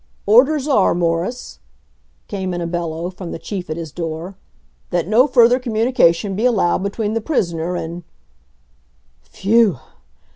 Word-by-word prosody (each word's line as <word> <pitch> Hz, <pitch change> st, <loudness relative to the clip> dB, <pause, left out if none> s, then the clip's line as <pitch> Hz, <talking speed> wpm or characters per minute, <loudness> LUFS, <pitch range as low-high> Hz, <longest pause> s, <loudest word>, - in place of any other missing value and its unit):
"Orders 270 Hz, +7 st, +4 dB
are, 235 Hz, -, +3 dB
Morris," 175 Hz, +8 st, -2 dB, 0.7 s
came 190 Hz, -3 st, -4 dB
in -, -, -3 dB
a -, -, -2 dB
bellow 170 Hz, 0 st, -3 dB
from 180 Hz, -2 st, -8 dB
the -, -, -5 dB
Chief 185 Hz, 0 st, -6 dB
at 155 Hz, -, -3 dB
his 165 Hz, -3 st, -6 dB
door, 165 Hz, +3 st, -5 dB, 0.5 s
"that 175 Hz, -2 st, -1 dB
no 235 Hz, +7 st, +4 dB
further 245 Hz, -1 st, +5 dB
communication 220 Hz, -6 st, +1 dB
be 215 Hz, -, -2 dB
allowed 210 Hz, -8 st, +2 dB
between 205 Hz, +2 st, -2 dB
the 225 Hz, -, -1 dB
prisoner 175 Hz, -, -1 dB
and 170 Hz, 0 st, -5 dB, 0.7 s
" -, -, -40 dB
Phew! 210 Hz, -, +2 dB
185 Hz, 145 wpm, -19 LUFS, 165-225 Hz, 0.7 s, further